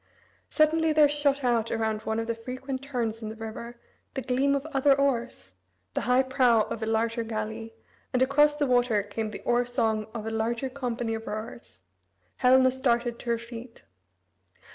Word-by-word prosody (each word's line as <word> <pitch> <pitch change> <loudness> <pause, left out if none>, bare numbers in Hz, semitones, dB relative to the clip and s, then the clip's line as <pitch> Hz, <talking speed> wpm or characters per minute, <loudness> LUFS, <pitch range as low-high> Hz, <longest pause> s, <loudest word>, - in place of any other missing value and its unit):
Suddenly 315 0 +3
there 305 -1 +6
shot 285 -1 +1
out 235 -2 +1
around 220 -1 -1
one 220 0 -2
of 225 - -2
the 230 - -1
frequent 255 +3 -6
turns 240 -5 -3
in 215 - -5
the 220 - -7
river, 225 +2 -7 0.4
the 265 - -3
gleam 270 +2 +2
of 280 +1 -2
other 275 +1 +4
oars, 240 - -1 0.4
the - - -1
high 250 +1 +5
prow 255 -4 +3
of 225 - -6
a 220 - -2
larger 225 +1 0
galley, 225 0 -5 0.4
and 255 0 +3
across 295 +2 +4
the 295 - +1
water 245 -5 +2
came 215 +2 -4
the 210 - -8
oar 240 0 +2
song 225 -3 -1
of 220 -2 -4
a 225 - -3
larger 230 +4 -1
company 245 -3 -3
of 225 0 -5
rowers. 215 - -7 0.6
Helena 260 +1 +5
started 240 -2 0
to 240 - -6
her 235 - +2
feet. 235 +1 -10
240 Hz, 180 wpm, -27 LUFS, 225-260 Hz, 0.6 s, there